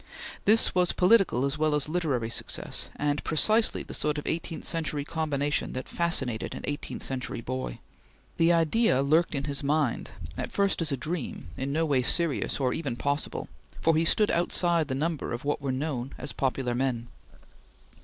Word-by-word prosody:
This 220 +2 +4
was 180 -1 +3
political 180 - +4
as 140 +2 -2
well 155 -1 +2
as 150 -1 0
literary 145 -9 -1
success, - - -1
and 145 0 -1
precisely 215 +8 +3
the - - -9
sort 150 0 0
of 150 - -4
eighteenth 165 0 -3
century 155 -3 -1
combination 145 -3 -1
that 130 0 -5
fascinated 135 -10 -1
an - - -6
eighteenth 145 +2 -4
century 130 -3 -3
boy. 130 - -4 0.6
The 165 +1 +4
idea 165 - +3
lurked 155 +3 +2
in 140 - -1
his 140 0 -3
mind, 145 -3 0 0.3
at - - -4
first 200 -3 +1
as 160 -2 0
a 140 - 0
dream, 155 +2 -4
in 135 +1 -3
no 160 +3 +1
way 140 -4 +2
serious 160 +3 +1
or 130 -2 +1
even 140 -7 -3
possible, 140 +4 -2 0.3
for 165 -1 +3
he 160 - +3
stood 210 +5 +3
outside 170 -2 +2
the 130 - -2
number 155 -1 -2
of 120 +3 -5
what 145 0 0
were 135 -1 -1
known 130 -1 -3
as - - -4
popular 130 -2 -1
men. 120 -2 -1
150 Hz, 175 wpm, -28 LUFS, 135-165 Hz, 0.6 s, This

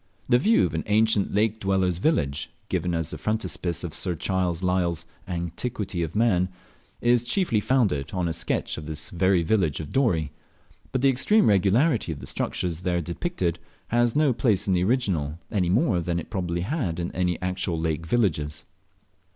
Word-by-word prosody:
The 120 - +5
view 220 - +4
of 80 - -3
an 80 - -1
ancient 110 -1 +3
lake 110 +1 +1
dweller's 95 -3 +1
village, 75 - 0 0.2
given 90 -1 -1
as 80 -1 -2
the - - -6
frontispiece 95 -5 -2
of 85 -4 -5
Sir 90 +1 -2
Charles 90 -1 -1
Lyell's 90 -3 0 0.2
"Antiquity 90 +2 -3
of 80 +2 -3
Man," 95 -5 +2 0.5
is 120 0 +3
chiefly 125 - +1
founded 105 - +1
on 90 -2 -1
a 80 - -1
sketch 85 - -1
of 75 - -9
this 80 0 -3
very 95 0 +2
village 85 -5 +1
of 75 -2 -6
Dorey; 85 - +1 0.6
but 130 - -1
the 135 - +6
extreme 170 - +3
regularity 105 - +3
of 75 - -5
the - - -8
structures 85 -2 -2
there 90 -1 0
depicted 85 - -2 0.3
has 120 0 +2
no 150 -3 +3
place 110 -4 +1
in 95 - +3
the 90 0 +2
original, 90 - 0
any 90 -4 +1
more 100 - +2
than 85 0 -1
it 85 - -6
probably 85 -2 -2
had 95 - -2
in 85 - -2 0.2
the 90 - 0
actual 90 -2 -2
lake 80 0 -2
villages. 75 -9 0
90 Hz, 175 wpm, -25 LUFS, 85-110 Hz, 0.6 s, the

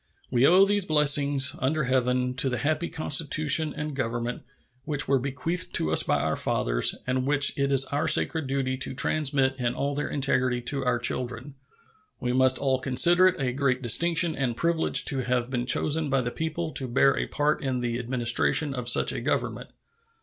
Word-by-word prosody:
We 125 +2 +3
owe 185 +3 +5
these 205 -1 +2
blessings, 145 -3 +3
under 155 +4 -1
Heaven, 125 0 -1
to 135 - +3
the 125 - -3
happy 155 +4 -2
Constitution 155 0 +2
and 150 -1 -5
Government 120 -2 -4 0.4
which 145 0 -3
were 135 -1 +1
bequeathed 140 +7 -3
to 80 - 0
us 80 - +5
by - - 0
our - - -2
fathers, - - +1
and 130 +1 -2
which 145 -1 +3
it 140 0 -1
is 135 -1 +4
our 145 +4 -3
sacred 160 -2 +2
duty 130 -1 -2
to 130 - -3
transmit 140 -1 0
in 120 0 -2
all 140 +2 -3
their 145 +1 -4
integrity 130 -3 -1
to 135 +3 -1
our 125 -1 0
children. 125 +2 -3 0.7
We 125 0 -3
must 130 0 +3
all 135 -2 -1
consider 170 +8 +4
it 185 - -1
a 125 -2 -2
great 130 -1 -1
distinction 165 +7 +2
and 125 -4 -3
privilege 170 +3 +1
to 135 - -1
have 125 0 -2
been 125 -1 -3
chosen 155 +3 +1
by 135 -1 +1
the 120 0 -4
people 160 +2 -5
to 130 - -2
bear 135 +3 +2
a - - -3
part 150 0 -2
in 130 -2 -3
the 120 0 -3
administration 125 +4 0
of 125 -2 -3
such - - +4
a - - -5
Government. - - -3
135 Hz, 190 wpm, -25 LUFS, 125-150 Hz, 0.7 s, owe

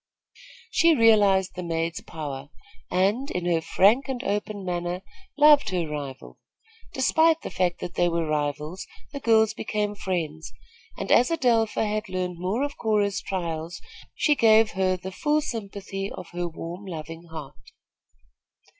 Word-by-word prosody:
She 335 -1 +5
realized 205 -6 +4
the 180 - -5
maid's 165 -1 -2
power 140 -3 -7 0.4
and, 205 +10 +1
in 180 -1 -3
her 170 -2 +2
frank 215 - +3
and 255 -2 -3
open 205 0 -3
manner, 175 +1 -3 0.3
loved 295 -4 +6
her 180 -4 -1
rival. 145 -3 -7 0.5
Despite 320 +5 +3
the - - -5
fact 180 -2 0
that 175 - -5
they 175 0 +2
were 170 -1 0
rivals, 150 +4 -2 0.2
the 280 - -5
girls 220 -3 +3
became 210 -1 -2
friends, 165 -6 -4 0.5
and - - -4
as 245 - +5
Adelpha 235 -9 +2
had 215 0 -2
learned 180 -1 -3
more 195 +9 -1
of 285 0 -4
Cora's 205 -3 +1
trials, 170 -3 -4 0.4
she 300 - +3
gave 225 -4 +5
her 185 -1 +1
the 190 +1 -7
full 295 +9 +1
sympathy 200 -6 -5
of 180 -2 -8
her 175 0 -2
warm, 170 +4 -8
loving 165 -1 -7
heart. 160 -4 -10
190 Hz, 145 wpm, -25 LUFS, 170-220 Hz, 0.5 s, loved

